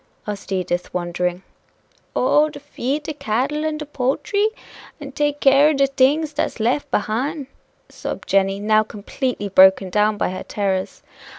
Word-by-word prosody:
asked 205 -1 -6
Edith, 180 -2 -2
wondering. 180 +1 -2 0.7
"Oh! 295 +4 +3
to 300 - -10
feed 290 0 -3
de 310 - -4
cattle 275 +4 -1
and 310 -1 -1
de 305 - -6
poultry? 295 +10 0 0.5
and 280 -2 -9
take 290 0 0
care 275 +2 +5
o' - - +2
de 275 -1 +3
things 280 +3 +2
dat's 290 - -2
lef 260 +6 0
behine," 270 +8 -1 0.4
sobbed - - -7
Jenny, 195 0 +2
now 215 +1 +3
completely 215 +2 -4
broken 190 -1 +5
down 210 +1 +2
by 180 - -1
her 185 - -5
terrors. 190 -2 -3
250 Hz, 155 wpm, -21 LUFS, 195-290 Hz, 0.7 s, care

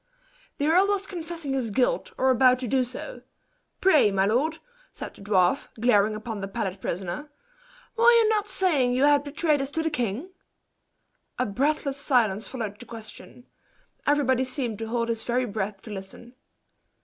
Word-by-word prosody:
"The 285 - -1
earl 355 +6 +4
was 400 -1 0
confessing 335 -6 -5
his 255 -4 -1
guilt, 270 - 0
or 260 0 +3
about 255 0 +5
to 255 -1 -4
do 260 +3 +2
so. 255 - -8 0.6
Pray, 310 - +5
my 195 -1 +1
lord," 275 +10 +1 0.3
said - - -8
the - - -16
dwarf, 195 +2 +2
glaring 215 -2 +3
upon 215 -1 -5
the 195 - -3
pallid 190 -1 -4
prisoner, 185 - -4 0.7
"were 465 0 +6
you 465 -2 +5
not 420 -1 +1
saying 290 -13 +1
you 255 +2 +2
had 290 0 +5
betrayed 300 0 0
us 270 - -3
to 320 +2 -2
the 320 - -1
king?" 250 - -2 1.1
A 255 - +1
breathless 275 +5 0
silence 235 -8 +1
followed 220 -5 -5
the 245 - -9
question 225 +2 -11 0.6
everybody 265 -3 +3
seemed 255 -5 -3
to 225 - -4
hold 230 0 -1
his 230 -1 -2
very 250 +2 0
breath 200 -2 -4
to 220 - -9
listen. 200 +5 -9
255 Hz, 170 wpm, -26 LUFS, 215-300 Hz, 1.1 s, were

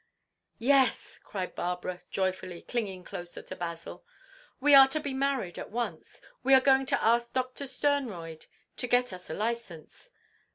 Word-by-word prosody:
—" - - -55
"Yes!" 260 0 +2
cried 185 -3 -5
Barbara, 180 0 -3
joyfully, 185 -2 -2
clinging 200 -7 -3
closer 175 -2 -8
to 185 - -8
Basil. 170 -2 -6 0.6
"We 290 +2 +4
are 270 -1 +10
to 310 +3 -1
be 285 -3 -4
married 265 -9 -1
at - - -7
once! 235 +2 -5 0.2
We 270 - +6
are - - +8
going 265 0 +3
to - - 0
ask 235 +1 +2
Doctor 255 +2 -2
Sternroyd 225 - -2 0.3
to 250 - -2
get 245 -2 +2
us 180 0 -9
a 160 - -3
licence." 230 - -5
235 Hz, 160 wpm, -29 LUFS, 180-265 Hz, 0.6 s, are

